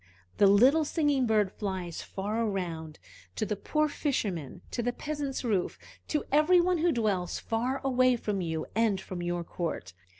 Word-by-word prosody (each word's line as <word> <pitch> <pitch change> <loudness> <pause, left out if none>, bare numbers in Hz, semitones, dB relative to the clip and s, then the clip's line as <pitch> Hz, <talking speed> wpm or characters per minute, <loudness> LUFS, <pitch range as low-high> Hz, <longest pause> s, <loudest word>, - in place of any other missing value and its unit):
The 200 - +6
little 255 +11 +6
singing 290 -4 +1
bird 210 -3 +2
flies 190 -5 -4
far 210 +4 -2
around, 170 -7 -3 0.4
to 215 - -1
the 210 - -1
poor 305 +9 0
fisherman, 205 - -2
to 240 - -1
the 245 +1 0
peasant's 290 -2 -4
roof, 205 -7 0 0.3
to 300 - -1
every 305 +5 +5
one 355 0 +2
who 340 +2 +3
dwells 205 - 0
far 245 +4 -1
away 255 -1 +3
from 210 -4 -2
you 160 -2 -2
and 220 -3 +2
from 185 -2 -6
your 175 0 -2
court. 170 - -4
220 Hz, 165 wpm, -29 LUFS, 185-275 Hz, 0.4 s, The